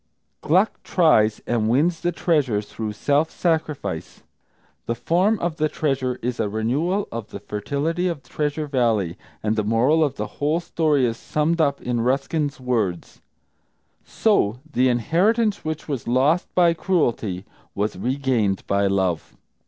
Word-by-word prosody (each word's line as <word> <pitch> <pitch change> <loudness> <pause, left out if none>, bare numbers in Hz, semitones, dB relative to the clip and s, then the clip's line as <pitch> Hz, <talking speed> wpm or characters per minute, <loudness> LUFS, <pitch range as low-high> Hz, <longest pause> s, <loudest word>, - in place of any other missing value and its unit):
Gluck 185 +8 +2
tries, 110 - +3
and 110 -2 0
wins 160 +8 +2
the 175 - 0
treasure 150 - +1
through 105 +1 -5
self 145 +8 +1
sacrifice. 155 - -2 0.6
The 115 - 0
form 180 - +2
of 170 -3 -3
the 155 0 +1
treasure 135 -4 -1
is 125 0 -2
a 110 -2 0
renewal 145 - 0
of 115 -2 -5
the - - -8
fertility 150 +11 -2
of 165 -6 -3
Treasure 150 +3 -2
Valley, 115 - +1 0.3
and 110 0 +1
the 110 - 0
moral 125 +9 +3
of 140 -3 -1
the - - -3 0.2
whole 150 +3 +2
story 155 -5 +1
is 115 -1 -1
summed 160 +7 0
up 140 -2 +1
in 120 -1 -1
Ruskin's 140 +4 0
words, 110 -9 -2 0.8
"So 125 - +1
the 130 +1 +3
inheritance 195 - +1
which 155 0 -4
was 140 -7 -4
lost 135 +8 +2
by 175 -2 +5
cruelty 120 - -1 0.3
was 105 +2 -1
regained 120 -3 0
by 100 0 +1
love." 95 -5 -1
135 Hz, 145 wpm, -23 LUFS, 115-160 Hz, 0.8 s, by